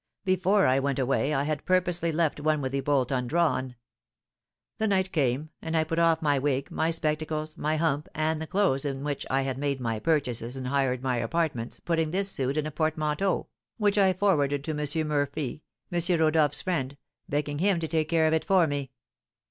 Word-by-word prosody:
Before 185 +2 +3
I 130 +1 +3
went 135 -1 -1
away 135 +2 +1
I 140 -2 +1
had 150 0 -2
purposely 175 -2 +1
left 160 -2 0
one 155 0 +1
with 130 -2 -3
the 140 0 -1
bolt 135 -2 +1
undrawn. 130 0 0 1.0
The 220 - +1
night 190 -2 +1
came, 145 +1 0
and 160 0 -2
I 160 - +3
put 165 +1 -2
off 165 -1 +3
my 145 -2 +2
wig, 135 0 -1
my 160 - 0
spectacles, 155 -1 -2
my 155 +1 -1
hump, 150 -2 0
and 155 0 0
the 160 - -5
clothes 185 -8 +1
in 135 -2 -3
which 145 -1 -3
I 135 +1 +1
had 135 -1 -3
made 140 -1 -1
my 115 -3 -2
purchases 125 -5 -1
and 130 -1 -4
hired 135 -2 0
my 130 -2 0
apartments, 140 -5 -2
putting 165 -2 0
this 195 +3 -1
suit 135 +2 -2
in 155 - 0
a 155 - -4
portmanteau, 155 +4 0 0.3
which 205 -2 +2
I 190 -1 +5
forwarded 145 -8 +1
to 155 - -3
M. 150 +1 0
Murphy, 145 -1 -2 0.3
M. 175 0 +2
Rodolph's 155 -2 +3
friend, 140 -7 -2 0.3
begging 145 0 -1
him 190 0 +2
to 160 - -2
take 155 -1 0
care 165 -1 +3
of 155 - +2
it 160 - +1
for 190 -3 +4
me. 145 -3 -3
155 Hz, 195 wpm, -27 LUFS, 135-165 Hz, 1.0 s, I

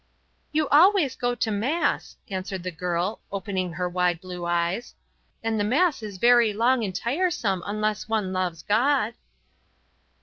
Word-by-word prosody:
"You 310 -1 +1
always 320 -3 +5
go 245 -1 -1
to 225 -2 -1
Mass," 255 +12 -1
answered 190 -2 -4
the 185 - -3
girl, 180 +3 -2
opening 190 -3 -3
her 180 +2 -2
wide 180 -1 0
blue 180 -1 -7
eyes, 175 +7 -1 0.5
"and 225 -1 0
the - - +2
Mass 270 - +2
is 205 -3 -7
very 235 0 +5
long 235 +3 +2
and 190 -3 -3
tiresome 235 - 0
unless 215 +1 -2
one 210 -4 0
loves 180 -3 -2
God." 235 +1 +2
210 Hz, 145 wpm, -25 LUFS, 185-245 Hz, 0.5 s, always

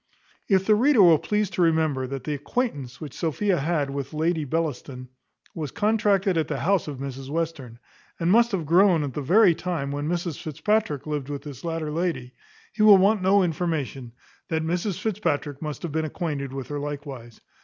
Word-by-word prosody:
If 190 -2 +3
the 215 - +5
reader 240 0 +5
will 165 -4 +6
please 210 -2 -1
to - - -2
remember 160 -6 +2
that 135 -1 -5
the 150 - -2
acquaintance 145 - -3
which 150 -5 -8
Sophia 175 +3 0
had 145 -2 -1
with 140 +2 -5
Lady 160 0 0
Bellaston 140 -4 -3 0.4
was 155 -3 -4
contracted 205 - +1
at 155 - -1
the - - -3
house 195 -1 +1
of 145 -3 -5
Mrs 135 0 -6
Western, 150 -7 -4 0.4
and 170 +1 +1
must 235 +2 +5
have 180 -6 -2
grown 175 0 +4
at 140 -3 -4
the 150 - -3
very 180 +6 +5
time 160 -5 -3
when 145 +1 -3
Mrs 170 -3 -3
Fitzpatrick 160 -1 -1
lived 145 -3 -3
with 145 -1 -5
this 145 -5 -9
latter 165 -2 -3
lady, 155 -7 -2 0.4
he 215 - -3
will 210 -2 +9
want 200 +2 +3
no 195 +1 +4
information, 150 -8 -3 0.4
that 160 -1 -1
Mrs 175 +3 -2
Fitzpatrick 150 -9 -2
must 150 -2 -5
have 170 - -3
been 160 +1 -1
acquainted 150 -4 -4
with 135 -2 -6
her 145 0 -3
likewise. 140 -5 -7
160 Hz, 185 wpm, -25 LUFS, 140-185 Hz, 0.4 s, will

